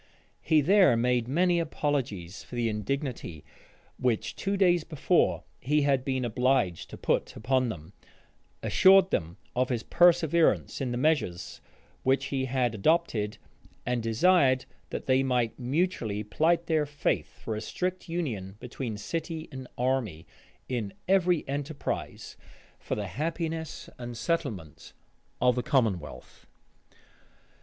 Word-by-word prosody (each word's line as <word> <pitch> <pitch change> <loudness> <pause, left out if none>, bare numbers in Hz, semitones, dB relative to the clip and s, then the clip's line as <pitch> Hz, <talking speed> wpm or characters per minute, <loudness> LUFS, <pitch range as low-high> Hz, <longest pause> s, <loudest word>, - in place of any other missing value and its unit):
He 155 -1 +3
there 185 - +5
made 120 0 +1
many 175 +5 +2
apologies 130 - -2
for - - -10
the 120 -1 0
indignity 105 - -4 0.5
which 115 -3 0
two 195 +1 -1
days 175 -4 +4
before 155 -4 +1 0.2
he 150 +3 +1
had 135 -2 +2
been 130 -2 -1
obliged 125 -6 +1
to - - -9
put - - -1
upon 130 +2 +1
them; 85 -3 -8 0.7
assured 190 0 +6
them 85 +1 -2 0.2
of 125 +1 +1
his 120 -3 -1
perseverance 170 -3 +3
in 130 -2 -1
the 120 - -2
measures 130 - 0 0.4
which 135 +1 +2
he 130 -1 0
had 125 -2 0
adopted; 110 - +1 0.5
and 125 -1 0
desired 130 +3 +3 0.2
that - - -5
they 130 0 +3
might 125 -3 0
mutually 125 - -1
plight 165 +10 +1
their 155 -3 +1
faith 145 0 -2
for 110 - -4
a 105 - -4
strict 180 +9 -3
union 115 - -3
between 120 -3 -5
city 160 +7 -4
and 130 -1 -8
army, 125 -10 -1 0.4
in 115 -6 -3
every 180 -3 +2
enterprise 140 +2 -4 0.4
for - - -3
the 105 - -3
happiness 160 - -4
and 120 -1 -6
settlement 115 - -3 0.5
of 125 0 +4
the 125 - -1
commonwealth. 95 - -2
130 Hz, 130 wpm, -28 LUFS, 115-160 Hz, 0.7 s, assured